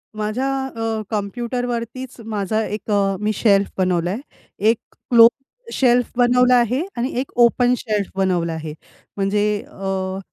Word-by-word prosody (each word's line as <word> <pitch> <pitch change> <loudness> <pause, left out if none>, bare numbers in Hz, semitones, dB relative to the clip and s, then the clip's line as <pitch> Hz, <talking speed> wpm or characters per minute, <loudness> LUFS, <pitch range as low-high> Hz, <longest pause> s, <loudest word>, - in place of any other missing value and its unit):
माझ्या 215 +6 -2 0.3
अ, 225 -1 -2
कॉम्प्युटरवरतीच 240 +3 -4
माझा 215 0 -1
एक 210 0 -5
अ, 195 -1 +2
मी 210 +1 +1
शेल्फ 200 -2 +3
बनवलाय. 180 +1 0 0.4
एक 220 +3 +3 0.3
क्लोज 235 +3 +6 0.3
शेल्फ 245 -2 +2
बनवला 250 +1 +4
आहे 245 +4 +2 0.2
आणि 245 +3 -1
एक 265 - -4
ओपन 245 +1 +4
शेल्फ 210 -4 -2
बनवला 180 -3 0
आहे. 155 -1 -6 0.4
म्हणजे 200 +1 +1 0.2
अ 190 -1 -3
215 Hz, 130 wpm, -20 LUFS, 195-245 Hz, 0.4 s, क्लोज